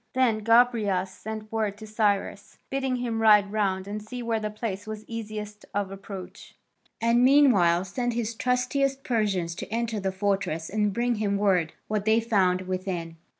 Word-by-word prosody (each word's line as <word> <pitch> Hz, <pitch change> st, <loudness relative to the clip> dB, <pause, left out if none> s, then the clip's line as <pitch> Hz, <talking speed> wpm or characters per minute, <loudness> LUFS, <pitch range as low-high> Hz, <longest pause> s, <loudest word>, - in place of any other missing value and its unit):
Then 245 Hz, -4 st, +3 dB
Gobryas 215 Hz, -5 st, +3 dB
sent 215 Hz, +2 st, -7 dB
word 215 Hz, -3 st, -1 dB
to 215 Hz, -, -9 dB
Cyrus, 205 Hz, -2 st, -1 dB
bidding 265 Hz, -1 st, 0 dB
him 235 Hz, -2 st, -2 dB
ride 210 Hz, -2 st, +5 dB
round 195 Hz, -3 st, 0 dB
and 210 Hz, +1 st, -4 dB
see 245 Hz, +4 st, -7 dB
where 230 Hz, -1 st, 0 dB
the 215 Hz, 0 st, -3 dB
place 210 Hz, -1 st, -5 dB
was 215 Hz, 0 st, -6 dB
easiest 210 Hz, -2 st, -6 dB
of 200 Hz, -1 st, -1 dB
approach, 195 Hz, -2 st, -9 dB, 0.4 s
and 235 Hz, +2 st, +3 dB
meanwhile 205 Hz, -11 st, +5 dB
send 245 Hz, +5 st, -2 dB
his 230 Hz, -1 st, -2 dB
trustiest 260 Hz, +3 st, 0 dB
Persians 200 Hz, -8 st, 0 dB
to 170 Hz, -, -8 dB
enter 230 Hz, -1 st, -1 dB
the 190 Hz, -1 st, -1 dB
fortress 190 Hz, -4 st, -1 dB
and 210 Hz, 0 st, +1 dB
bring 235 Hz, +3 st, 0 dB
him 200 Hz, -2 st, 0 dB
word 185 Hz, -5 st, +2 dB
what 210 Hz, -1 st, -1 dB
they 220 Hz, +1 st, +4 dB
found 195 Hz, -6 st, +2 dB
within. 185 Hz, -3 st, -4 dB
215 Hz, 165 wpm, -26 LUFS, 195-230 Hz, 0.4 s, ride